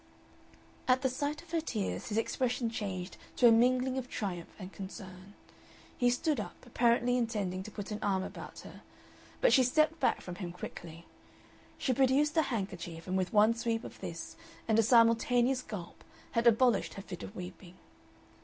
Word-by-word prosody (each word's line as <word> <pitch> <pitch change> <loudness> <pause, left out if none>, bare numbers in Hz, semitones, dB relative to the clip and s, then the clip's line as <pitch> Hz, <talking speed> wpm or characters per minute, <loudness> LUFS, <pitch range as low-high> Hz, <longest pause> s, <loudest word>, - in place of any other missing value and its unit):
At 260 +1 +3
the 260 - +3
sight 290 +4 -3
of 335 - -18
her 335 -1 +1
tears 215 -10 -3
his 215 - -2
expression 240 0 0
changed 190 -4 -4 0.2
to 245 - +6
a - - +8
mingling 255 +3 +3
of 250 -1 -7
triumph 180 -5 -4
and 190 -1 -9
concern. 190 0 -9 0.6
He 245 - +3
stood 255 +3 0
up, 210 - -5
apparently 240 0 +2
intending 205 -6 -1
to 190 - -8
put 205 0 -7
an 210 - -3
arm 190 -2 +1
about - - -8
her, - - -12 0.6
but - - +5
she 265 - +7
stepped 310 +6 +2
back - - +2
from 180 -1 -8
him 175 -4 -5
quickly. 170 -1 -9 0.7
She 260 - 0
produced 275 +4 +3
a 320 - +5
handkerchief, 185 - -4
and 185 - -2
with 185 -1 0
one 215 +1 +5
sweep 230 0 -2
of - - -10
this - - -6 0.3
and 220 0 +3
a - - +8
simultaneous 240 +2 +4
gulp 200 -8 -8 0.3
had 230 +1 +2
abolished 235 -2 +3
her 195 - -7
fit 180 -3 -8
of 205 - -8
weeping. 180 0 -9
230 Hz, 175 wpm, -32 LUFS, 190-255 Hz, 0.7 s, a